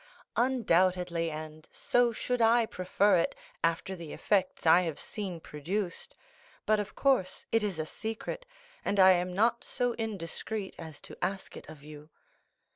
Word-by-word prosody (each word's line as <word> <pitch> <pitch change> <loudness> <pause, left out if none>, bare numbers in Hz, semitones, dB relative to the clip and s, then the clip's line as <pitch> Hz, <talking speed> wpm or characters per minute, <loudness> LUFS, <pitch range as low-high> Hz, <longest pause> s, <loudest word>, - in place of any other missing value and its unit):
"Undoubtedly, 180 -8 +2
and 155 0 -8
so 245 -1 +2
should 245 +2 -2
I 230 +1 +5
prefer 190 0 +2
it, 170 - 0 0.3
after 165 +3 0
the 170 -4 -8
effects 190 -4 0
I 165 +2 +7
have 165 -4 -3
seen 190 -5 -5
produced; 170 +5 -4 0.5
but 215 0 +3
of 210 0 -5
course 265 -9 +1
it 225 - +3
is 205 -5 -2
a 155 - -2
secret, 225 - -5 0.4
and 200 - 0
I 190 0 +9
am 180 0 +1
not 230 +5 +2
so 245 -1 -1
indiscreet 205 0 -4
as 160 -3 -9
to - - -10
ask 190 +1 -3
it - - -10
of 155 -3 -12
you." 150 0 -11
185 Hz, 155 wpm, -30 LUFS, 165-220 Hz, 0.5 s, I